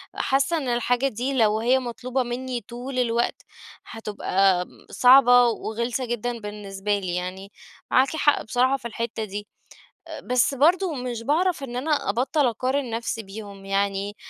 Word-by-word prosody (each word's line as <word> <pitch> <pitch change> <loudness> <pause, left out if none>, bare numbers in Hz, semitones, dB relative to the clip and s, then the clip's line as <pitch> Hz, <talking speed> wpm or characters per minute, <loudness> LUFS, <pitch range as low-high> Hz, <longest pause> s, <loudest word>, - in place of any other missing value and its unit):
حاسة 270 +5 +1
إن 285 -5 -3
الحاجة 245 +2 +1
دي 255 +2 -3
لو 220 -4 +3
هي 250 +4 +3
مطلوبة 255 +1 -3
مني 245 0 -4
طول 245 +4 -6
الوقت 235 -1 0 0.4
هتبقى 195 -4 0 0.3
صعبة 245 -1 +7
وغلسة 235 +2 -2
جدًا 240 0 -3
بالنسبة 205 -1 -3
لي، 180 -2 -3
يعني 185 +2 -5 0.4
معاكِ 265 +4 +3
حق 295 -2 +3
بصراحة 255 +4 +1
في 235 - -7
الحتة 230 -1 -4
دي. 205 0 -6 0.6
آآ، - - -7
بس 250 +2 +1
برضو 340 +5 +3
مش 250 -3 -4
باعرف 325 +5 +1
إن 245 -3 -6
أنا 295 +4 0
أبطل 265 +4 +1
أقارن 255 +3 -1
نفسي 230 0 -3
بيهم، 200 -1 -10
يعني 200 +1 -1
240 Hz, 145 wpm, -24 LUFS, 210-260 Hz, 0.6 s, صعبة